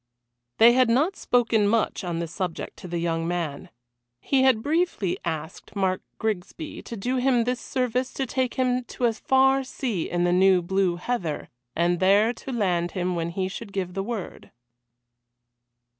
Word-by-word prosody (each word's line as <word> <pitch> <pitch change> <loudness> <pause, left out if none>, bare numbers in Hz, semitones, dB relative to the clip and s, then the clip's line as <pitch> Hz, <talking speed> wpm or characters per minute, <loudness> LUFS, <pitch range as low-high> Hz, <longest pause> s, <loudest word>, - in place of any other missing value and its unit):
They 235 +1 +7
had 255 -1 +4
not 295 +11 +2
spoken 230 -4 +2
much 220 -1 +1
on 175 -2 -3
the 170 0 -2
subject 180 0 -4
to - - -9
the 175 0 -3
young 165 -1 -1
man. 170 -5 -3 0.5
He 270 - +1
had 260 -4 +4
briefly 310 - 0
asked 160 +3 -5
Mark 190 -2 0 0.2
Grigsby 220 - -4
to 230 - -8
do 250 +6 -1
him 250 -2 +3
this 250 +1 -1
service 255 0 -1
to 270 - -2
take 255 0 -1
him 255 -1 +1
to 245 - -3
a 230 - +3
far 265 +3 +3
sea 240 - -3
in 175 0 0
the 175 0 +2
new 185 -1 +4
Blue 190 0 +1
Heather, 175 -5 -3 0.3
and 170 +1 +1
there 205 +5 +4
to 265 - -8
land 180 -7 0
him 180 -1 -1
when 165 0 -2
he 185 +2 -2
should 200 +3 -7
give 185 -2 -3
the 195 - -2
word. 215 -2 -6
205 Hz, 175 wpm, -25 LUFS, 175-250 Hz, 0.5 s, They